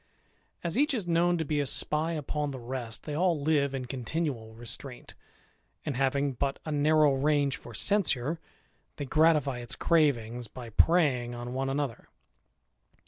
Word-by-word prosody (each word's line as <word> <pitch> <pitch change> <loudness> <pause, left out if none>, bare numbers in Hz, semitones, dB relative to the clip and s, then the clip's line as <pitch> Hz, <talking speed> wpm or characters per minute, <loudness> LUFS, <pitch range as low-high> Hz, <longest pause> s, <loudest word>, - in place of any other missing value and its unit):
As 170 +7 0
each 290 -1 +3
is 205 -7 -2
known 175 +1 +3
to 160 - -2
be 150 0 0
a 145 - 0
spy 155 +5 0
upon 150 -1 -2
the 135 - -5
rest, 120 -1 -5
they 150 - -5
all 170 0 +2
live 140 -2 +1
in 130 -1 -3
continual 125 -3 -3
restraint; 120 +2 -6 0.7
and 145 -4 -2
having 140 +1 +1
but 135 +2 -1
a 155 - -3
narrow 150 0 +4
range 140 -1 +2
for 120 - -11
censure, 165 - +1 0.6
they 145 - -4
gratify 150 -3 +3
its 120 -1 -5
cravings 125 -8 +1
by 115 +1 -9
preying 130 -5 +3
on 120 +1 -6
one 135 +1 -1
another. 135 -3 -3
140 Hz, 155 wpm, -29 LUFS, 125-155 Hz, 0.7 s, narrow